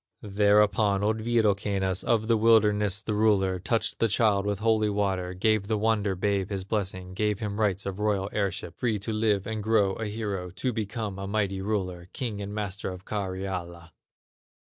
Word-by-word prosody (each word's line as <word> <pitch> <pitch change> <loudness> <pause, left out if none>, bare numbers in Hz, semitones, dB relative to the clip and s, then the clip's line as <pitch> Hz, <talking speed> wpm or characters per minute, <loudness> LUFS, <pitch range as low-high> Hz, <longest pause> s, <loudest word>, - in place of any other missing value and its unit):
Thereupon 105 0 +3
old 110 +1 +1
Wirokannas, 100 -4 +1
Of 110 -2 +1
the 115 - +4
wilderness 105 -2 +3
the 110 - -2
ruler, 100 -3 +2
Touched 110 +6 -1
the 115 - +3
child 105 -2 +2
with 100 -1 0
holy 110 0 +2
water, 95 -3 -1
Gave 105 +1 +1
the 110 0 0
wonder 105 -2 +1
babe 100 0 0
his 100 -2 -3
blessing, 95 -3 -3
Gave 105 +1 0
him 105 -1 -4
rights 100 -2 0
of 100 0 -4
royal 105 -2 0
heirship, 95 -4 -2
Free 115 -4 +1
to 105 +3 -4
live 110 -3 +1
and 110 -1 -3
grow 105 -2 +2
a 110 +1 -4
hero, 105 -4 -3
To 95 +8 -3
become 105 -2 -4
a 100 - -4
mighty 100 -2 -1
ruler, 95 -4 -3
King 110 -5 -4
and 100 0 -5
Master 100 -2 -4
of 90 +1 -8
Karyala. 95 -4 -4
105 Hz, 175 wpm, -27 LUFS, 95-110 Hz, -, the